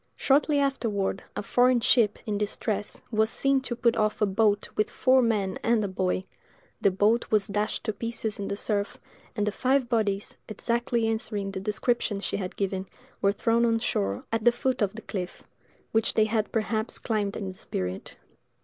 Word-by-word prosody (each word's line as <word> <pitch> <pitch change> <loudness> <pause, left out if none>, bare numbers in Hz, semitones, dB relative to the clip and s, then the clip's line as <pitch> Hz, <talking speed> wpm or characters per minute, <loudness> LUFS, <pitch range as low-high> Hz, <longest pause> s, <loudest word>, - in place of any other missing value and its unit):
Shortly 290 +2 +3
afterward, 225 -9 0
a - - -3
foreign 250 +3 +4
ship, 225 -2 +3
in 205 -2 -1
distress, 210 0 -2
was 220 0 +2
seen 275 +3 +2
to 245 -2 -3
put 235 -1 +2
off 215 -1 +1
a 210 - +4
boat 205 +1 +2
with 215 - +1
four 260 0 +4
men 210 -5 0
and 230 -2 +2
a - - -1
boy: 185 -1 -1 0.6
the - - +5
boat 210 +5 +2
was 210 -2 +3
dashed 210 +1 -2
to 215 - -1
pieces 230 -2 -4
in 200 - -3
the - - -2
surf, 205 0 -1 0.4
and 210 -2 0
the 210 - 0
five 260 +2 +1
bodies, 210 -4 0
exactly 235 +1 0
answering 215 -3 -2
the 190 - -4
description 210 +1 0
she 200 - -2
had 190 -1 -5
given, 190 -1 -2 0.3
were 200 - +4
thrown 230 +3 +1
on 230 -1 +3
shore 100 - -1
at 225 -1 0
the 240 - +6
foot 255 +1 -1
of 200 -2 +1
the 225 - -8
cliff, 185 -3 -5 0.5
which 225 0 +1
they 220 - +5
had 215 -1 -1
perhaps 220 0 -1
climbed 210 -3 -1
in 195 -3 -4
the - - -7
spirit! 90 - -5
215 Hz, 185 wpm, -27 LUFS, 200-235 Hz, 0.6 s, the